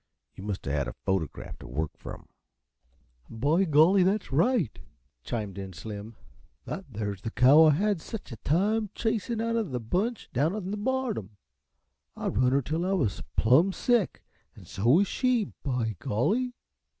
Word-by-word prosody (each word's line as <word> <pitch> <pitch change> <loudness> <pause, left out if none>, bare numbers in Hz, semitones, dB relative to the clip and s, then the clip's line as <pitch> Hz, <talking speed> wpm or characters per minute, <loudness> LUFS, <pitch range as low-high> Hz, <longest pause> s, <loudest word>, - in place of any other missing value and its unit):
You 95 - -10
must 100 -2 -4
a 70 - -2
had 70 -2 0
a - - -5
photograph 95 -6 -2
t' - - -10
work 75 +5 -2
from." - - -9 1.0
"By 145 +12 +2
golly, 165 +5 +5
that's 195 +3 +1
right," 170 - +2 0.4
chimed 105 -4 -4
in 95 -1 -7
Slim. 105 +4 -8 0.5
"That 195 - -5
there's 100 -3 -4
the 115 - -3
cow 135 +7 +6
I 155 - +6
had 200 +2 +1
sech 220 - -7
a 115 - -7
time 205 - +1
chasin' 225 0 -1
out 230 +1 0
uh 230 - +2
the 135 - -3
bunch 195 - -2
down 150 - +1
on 195 -3 -4
the - - -1
bottom. 215 - -2 0.8
I - - -2
run 125 +3 +2
her 140 +1 +2
till 160 +6 -2
I 190 +2 0
was 120 - 0 0.2
plum 135 - +5
sick, 240 -4 +1 0.3
an' - - -14
so 100 +4 -3
was 175 +10 +6
she, 250 -5 +1
by 120 -7 -1
golly. 235 - 0
155 Hz, 170 wpm, -28 LUFS, -, 1.0 s, cow